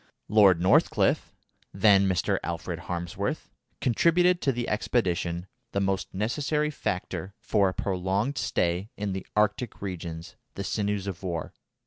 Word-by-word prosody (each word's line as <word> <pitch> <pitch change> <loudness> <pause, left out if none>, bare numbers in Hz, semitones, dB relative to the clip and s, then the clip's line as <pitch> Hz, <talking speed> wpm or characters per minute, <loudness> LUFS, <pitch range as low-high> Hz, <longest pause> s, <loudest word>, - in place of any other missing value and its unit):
Lord 100 -5 +6
Northcliffe 90 +2 +3 0.4
(then 100 -1 +5
Mr. 90 -4 +1
Alfred - - -4
Harmsworth) 85 -1 -3 0.3
contributed 175 +8 +3
to 135 - +2
the 120 -1 -3
expedition 90 -6 0 0.3
the 100 - +1
most 95 -1 -1
necessary 150 +9 0
factor 95 - -4
for 100 -3 +2
a - - -4
prolonged 100 +8 -1
stay 90 +4 0
in 100 -1 -2
the 95 - -5
Arctic 105 +2 +1
regions, 85 -4 -6 0.2
the 100 - -4
sinews 105 -1 -1
of 100 -2 -5
war. 85 -4 -4
100 Hz, 130 wpm, -27 LUFS, 90-110 Hz, 0.4 s, Lord